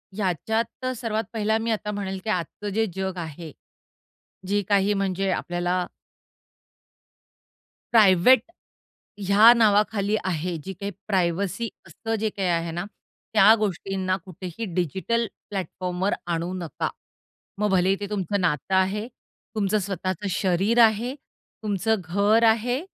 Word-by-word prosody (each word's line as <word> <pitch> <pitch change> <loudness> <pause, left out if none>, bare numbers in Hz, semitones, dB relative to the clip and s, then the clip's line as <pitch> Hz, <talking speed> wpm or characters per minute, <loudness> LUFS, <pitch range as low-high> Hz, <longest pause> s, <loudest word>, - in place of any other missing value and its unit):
ह्याच्यात 215 - -2
अ, 255 - +1
सर्वात 225 -2 -2
पहिला 220 0 +1
मी 225 +1 -1
आता 210 -1 -2
म्हणेल, 195 -2 -4
की 220 - -4
आजचं 195 +2 -2
जे 225 +2 +2
जग 190 -1 -3
आहे, 160 -1 -7 1.0
जे 205 +1 +1
काही 200 0 +3
म्हणजे 195 -1 -1
आपल्याला 175 0 -1 2.1
प्रायव्हेट, 215 +2 +6 0.9
ह्या 210 +4 +8
नावाखाली 210 -2 +3
आहे 175 -1 -2
जी 195 - -4
काही 200 +2 -5 0.2
प्रायव्हसी 190 +3 0 0.2
असतं 225 0 -4
जे 220 +1 0
काही 195 -2 -3
आहे 170 -1 0
ना, 175 +2 -4 0.5
त्या 220 0 +7
गोष्टींना 195 -2 -1
कुठेही 185 +3 -6
डिजिटल 190 +7 0 0.2
प्लॅटफॉर्मवर 185 0 -2 0.2
आणू 170 +2 -2
नका. 170 -5 -3 0.7
मग 210 +1 +1
भलेही 190 +1 +3
ते 205 - -4
तुमचं 200 -1 -1
नातं 170 +2 0
आहे. 195 +4 +1 0.5
तुमचं 210 0 +1
स्वतःचं 190 0 -3
शरीर 195 +5 +2
आहे. 225 +3 +2 0.5
तुमचं 215 +1 +1
घर 200 +7 +2
आहे 240 +3 +1
195 Hz, 125 wpm, -25 LUFS, 180-215 Hz, 2.1 s, ह्या